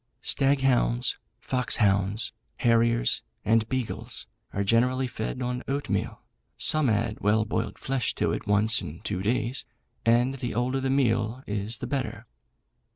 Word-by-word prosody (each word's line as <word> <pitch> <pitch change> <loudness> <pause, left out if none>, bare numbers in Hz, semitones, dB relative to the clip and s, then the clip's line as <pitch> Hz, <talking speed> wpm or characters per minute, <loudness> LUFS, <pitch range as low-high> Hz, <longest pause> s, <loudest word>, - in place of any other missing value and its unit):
Stag 135 0 +3
hounds, 125 -2 +2 0.2
fox 125 -2 -1
hounds, 100 +1 +2 0.3
harriers, 115 0 +3 0.2
and 110 +1 +3
beagles, 115 -3 -3 0.3
are 100 - -1
generally 125 +5 +2
fed 125 +1 -4
on 125 0 -2
oatmeal, 140 +1 -2 0.4
some 155 -4 +3
add 105 -2 0
well 105 +1 +2
boiled 110 - -2
flesh 130 -4 -1
to - - +1
it - - -4
once 105 +3 +4
in 75 +3 -8
two 95 -3 -3
days, 120 +4 0 0.4
and 120 +4 +3
the 120 -3 -3
older 125 +3 0
the 135 - 0
meal 120 -2 +1
is 105 +2 -2
the - - -5
better. 135 0 -3
120 Hz, 145 wpm, -27 LUFS, 110-130 Hz, 0.4 s, once